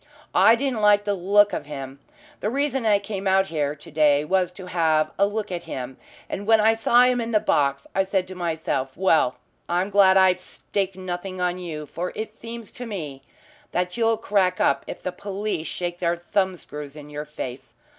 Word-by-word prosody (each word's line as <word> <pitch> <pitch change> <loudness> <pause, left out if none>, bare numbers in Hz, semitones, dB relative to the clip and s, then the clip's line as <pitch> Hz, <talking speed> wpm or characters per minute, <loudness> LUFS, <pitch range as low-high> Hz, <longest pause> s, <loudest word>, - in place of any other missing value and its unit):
"I 230 - +6
didn't 250 -2 -1
like 205 -1 +5
the 205 0 0
look 200 +2 +4
of - - -4
him. 135 -2 -7 0.4
The 210 - -1
reason 270 -1 0
I 205 -1 +5
came 200 -1 -5
out 190 0 +4
here 150 -2 -1
to 150 +2 -14
day 150 -1 +3
was 185 +1 +1
to 185 0 -10
have 160 -3 +1
a 200 - +5
look 210 -1 -4
at 175 -1 -4
him. 130 0 -6 0.3
And 200 +2 -5
when 225 -1 +6
I 220 +1 +5
saw 235 +2 +4
him 250 -1 +3
in 230 - -3
the 220 -2 +3
box 140 -6 +1
I 195 - +3
said 190 -1 0
to - - -6
myself, 160 -7 -2
'Well, 160 -8 +3 0.3
I'm 180 +3 0
glad 195 -1 +6
I've 190 -1 +5
staked 195 -2 -3
nothing 185 0 -5
on 180 0 0
you, 155 -4 -6
for 175 +5 -4
it 220 0 -5
seems 230 0 -9
to 245 - -7
me 150 -10 -6 0.5
that 180 0 -1
you'll 225 -1 +2
crack 195 -4 +1
up - - +2
if - - -7
the 185 - -2
police 200 -2 -4
shake 175 -1 -4
their 170 -1 0
thumb 190 +2 0
screws 150 -4 -9
in 150 -1 -11
your 150 +1 -5
face.' 130 -4 -7
185 Hz, 205 wpm, -24 LUFS, 155-205 Hz, 0.5 s, I